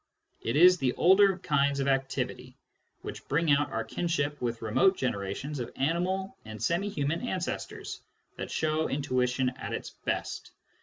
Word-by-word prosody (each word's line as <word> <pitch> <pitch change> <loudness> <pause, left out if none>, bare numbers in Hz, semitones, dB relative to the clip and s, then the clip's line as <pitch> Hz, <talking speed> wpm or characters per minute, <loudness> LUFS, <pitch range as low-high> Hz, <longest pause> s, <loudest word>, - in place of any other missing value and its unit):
It 115 - -2
is 180 +3 +7
the 130 -2 +1
older 190 +1 +5
kinds 140 -5 +1
of 135 - 0
activity, 135 0 -1 0.5
which - - -7
bring 160 +1 +2
out 145 +1 +3
our - - -1
kinship 150 -4 -2
with 115 -2 -2
remote 185 - +3
generations 125 +5 -3
of 120 - -4
animal 180 +7 -1
aitd 110 -1 -8
semi 185 +5 +1
human 150 -3 -1
ancestors, 190 -8 -4 0.3
that - - -5
show 155 0 0
intuition 130 -2 +1
at - - -5
its - - -4
best. - - -4
145 Hz, 150 wpm, -29 LUFS, 130-175 Hz, 0.5 s, is